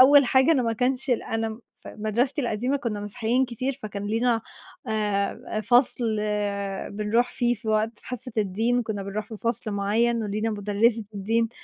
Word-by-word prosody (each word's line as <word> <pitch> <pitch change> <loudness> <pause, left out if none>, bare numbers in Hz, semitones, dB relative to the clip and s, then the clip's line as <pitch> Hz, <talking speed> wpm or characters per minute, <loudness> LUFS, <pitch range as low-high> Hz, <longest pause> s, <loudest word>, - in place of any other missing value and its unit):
أول 280 +1 +8
حاجة 265 +5 +5
أنا 260 -5 +3
ما 230 -1 +1
كانش 255 +3 0
ال 240 - +2
أنا 225 +1 -3 0.2
في - - -10
مدرستي 240 +7 0
القديمة 245 +4 0
كنا 230 -6 -3
مسيحيين 230 +5 0
كتير، 255 +3 -2
فكان 205 -1 -5
لينا 225 +1 +1 0.5
آآ، 210 0 -1
فصل 240 0 +3 0.8
بنروح 225 +4 +1
فيه 240 -1 +1
في 220 0 -8
وقت 215 +1 +2
في - - -18
حصة 250 -1 -4
الدين، 225 +5 +1
كنا 215 -3 -3
بنروح 205 +2 -4
في 220 - -7
فصل 230 -1 -2
معين 220 +4 +1
ولينا 215 +2 -1
مُدرّسة 210 +2 +1
الدين، 225 +3 +1
225 Hz, 165 wpm, -25 LUFS, 210-245 Hz, 0.8 s, أول